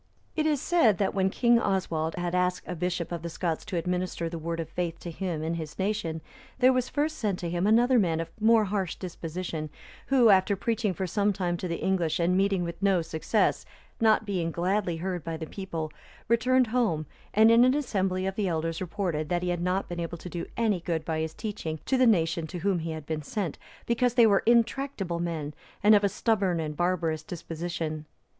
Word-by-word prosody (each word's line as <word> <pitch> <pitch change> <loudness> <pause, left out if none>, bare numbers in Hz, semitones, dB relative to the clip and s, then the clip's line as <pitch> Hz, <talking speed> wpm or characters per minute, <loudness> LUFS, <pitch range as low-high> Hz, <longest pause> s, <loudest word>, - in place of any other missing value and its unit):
It 310 -1 +1
is 300 -3 +2
said, 275 - +3
that 200 - 0
when 190 -1 +2
King 235 +3 +3
Oswald 165 -6 -1
had 175 -1 -3
asked 180 0 0
a - - -3
bishop 175 0 -2
of 170 -2 -3
the 170 - -5
Scots 165 -1 -2
to 185 - -3
administer 180 0 -2
the 165 0 -5
Word 165 +1 -3
of 165 - -3
faith 170 0 -3
to 170 - -6
him 165 -3 -3
and 165 +1 -2
his 155 -2 -7
nation, 190 -5 -2 0.4
there 260 0 +5
was 255 -1 0
first 305 +2 -1
sent 205 -5 0
to 175 - -4
him 175 +3 0
another 240 +3 +5
man 165 -5 +1
of 165 - -4
more 220 0 +5
harsh 195 -3 -2
disposition,(312) 165 -3 -5 0.4
who, 250 -3 +5
after 195 +1 +4
preaching 215 -1 -1
for 190 - -2
some 205 +3 +1
time 180 -3 -1
to 180 - -4
the 170 -1 -4
English 180 -5 +1
and 175 +2 +2
meeting 195 -1 +2
with 170 +1 -6
no 195 -4 +3
success, 165 +6 0 0.4
not 220 -1 +4
being 180 -5 -1
gladly 180 +1 0
heard 180 -1 -3
by 165 0 -4
the 160 - -5
people, 165 -4 -5 0.3
returned 255 +3 +3
home, 205 -12 +1 0.3
and 220 +2 +6
in 230 +1 +7
an 255 +2 +4
assembly 190 -9 0
of 195 - -1
the 200 0 -1
elders 165 0 -2
reported, 175 -5 -2
that 175 0 0
he 180 - -1
had 175 -1 -1
not 180 +2 0
been 175 0 -5
able 170 0 -4
to 180 - -9
do 170 0 -5
any 220 -5 +2
good 165 -2 -2
by 160 -1 -1
his 160 0 -3
teaching 195 -8 -4
to 265 - +1
the 255 -1 +4
nation 165 -5 +2
to 180 - -6
whom 185 +1 0
he 165 0 -4
had 160 -2 -5
been 155 0 -3
sent, 175 +2 -4 0.3
because 240 +1 +1
they 240 -2 +7
were 200 -3 +4
intractable 235 -6 +1
men, 160 -4 -3 0.3
and 210 +1 +7
of 205 -1 +5
a 200 - +3
stubborn 195 -4 +1
and 155 -2 -3
barbarous 170 -2 0
disposition. 165 -1 -5
180 Hz, 215 wpm, -28 LUFS, 165-210 Hz, 0.4 s, in